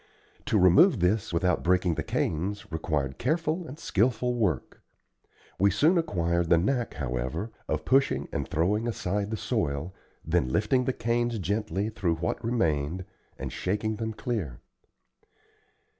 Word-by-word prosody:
To -, -, +2 dB
remove 95 Hz, -, +6 dB
this 95 Hz, +4 st, +1 dB
without 90 Hz, +1 st, +1 dB
breaking 90 Hz, 0 st, +2 dB
the -, -, -2 dB
canes, 100 Hz, +6 st, -2 dB
required 75 Hz, -4 st, -2 dB
careful 160 Hz, +5 st, 0 dB
and 145 Hz, -, -9 dB
skilful 125 Hz, -, +1 dB
work. 100 Hz, -, -1 dB, 0.8 s
We 100 Hz, +2 st, +5 dB
soon 150 Hz, -, +3 dB
acquired 85 Hz, -, 0 dB
the 85 Hz, -, +6 dB
knack, 120 Hz, +7 st, 0 dB
however, 65 Hz, -, -3 dB, 0.2 s
of 75 Hz, 0 st, -2 dB
pushing 135 Hz, +1 st, +2 dB
and -, -, -2 dB
throwing 105 Hz, +8 st, +1 dB
aside 105 Hz, -2 st, -2 dB
the 110 Hz, -, -2 dB
soil, 95 Hz, -, -2 dB, 0.3 s
then 80 Hz, -5 st, +1 dB
lifting 110 Hz, -, +2 dB
the 130 Hz, -, +2 dB
canes 120 Hz, 0 st, 0 dB
gently 100 Hz, +1 st, -1 dB
through 90 Hz, -6 st, -1 dB
what 80 Hz, +1 st, -3 dB
remained, 90 Hz, -7 st, 0 dB, 0.3 s
and -, -, -5 dB
shaking 105 Hz, +3 st, -1 dB
them 110 Hz, 0 st, -3 dB
clear. 105 Hz, -, -3 dB
100 Hz, 140 wpm, -28 LUFS, 85-115 Hz, 0.8 s, remove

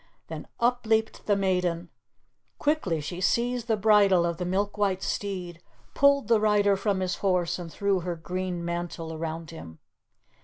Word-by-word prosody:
Then -, -, -7 dB
up 240 Hz, 0 st, +1 dB
leaped 220 Hz, 0 st, 0 dB
the 205 Hz, -, +4 dB
maiden. 180 Hz, -3 st, 0 dB, 0.7 s
Quickly 285 Hz, -, 0 dB
she 175 Hz, +5 st, -6 dB
seized 240 Hz, +3 st, 0 dB
the 220 Hz, -2 st, +1 dB
bridle 200 Hz, -4 st, +4 dB
of 170 Hz, -1 st, -2 dB
the 180 Hz, -, -3 dB
milk 200 Hz, +3 st, -1 dB
white 200 Hz, -3 st, 0 dB
steed, 180 Hz, -4 st, -4 dB, 0.3 s
pulled 280 Hz, -4 st, +4 dB
the 230 Hz, -2 st, +4 dB
rider 205 Hz, -2 st, +3 dB
from 195 Hz, -1 st, -1 dB
his 185 Hz, -1 st, -1 dB
horse, 180 Hz, -3 st, 0 dB
and 170 Hz, -2 st, -7 dB
threw 200 Hz, 0 st, 0 dB
her 175 Hz, 0 st, -3 dB
green 180 Hz, +1 st, -4 dB
mantle 170 Hz, -1 st, -4 dB
around 165 Hz, +1 st, -5 dB
him. 80 Hz, -, -10 dB
185 Hz, 160 wpm, -27 LUFS, 170-210 Hz, 0.7 s, the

